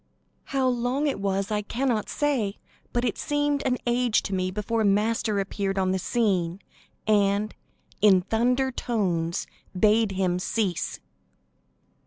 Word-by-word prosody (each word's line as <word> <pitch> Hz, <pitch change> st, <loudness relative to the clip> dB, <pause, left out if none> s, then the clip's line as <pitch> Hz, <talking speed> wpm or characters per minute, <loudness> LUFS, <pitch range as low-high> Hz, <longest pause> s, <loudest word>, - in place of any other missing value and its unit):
How 270 Hz, -1 st, 0 dB
long 250 Hz, +3 st, 0 dB
it 280 Hz, -8 st, 0 dB
was 195 Hz, +1 st, -1 dB
I 210 Hz, 0 st, +1 dB
cannot 230 Hz, +1 st, -1 dB
say, 260 Hz, -9 st, 0 dB, 0.3 s
but 240 Hz, +1 st, 0 dB
it 230 Hz, -, -2 dB
seemed 290 Hz, -1 st, 0 dB
an 250 Hz, -1 st, +1 dB
age 240 Hz, -2 st, +2 dB
to 195 Hz, -, -4 dB
me 185 Hz, -1 st, 0 dB
before 210 Hz, +3 st, -1 dB
Master 210 Hz, +1 st, +1 dB
appeared 195 Hz, 0 st, -2 dB
on 185 Hz, -1 st, +2 dB
the 190 Hz, -, 0 dB
scene, 185 Hz, -4 st, 0 dB, 0.5 s
and, 205 Hz, 0 st, +2 dB, 0.5 s
in 195 Hz, -3 st, +6 dB
thunder 250 Hz, +6 st, +1 dB
tones, 180 Hz, -10 st, -1 dB, 0.3 s
bade 215 Hz, 0 st, +4 dB
him 185 Hz, -2 st, 0 dB
cease. 190 Hz, -2 st, -1 dB
215 Hz, 135 wpm, -26 LUFS, 195-245 Hz, 0.5 s, in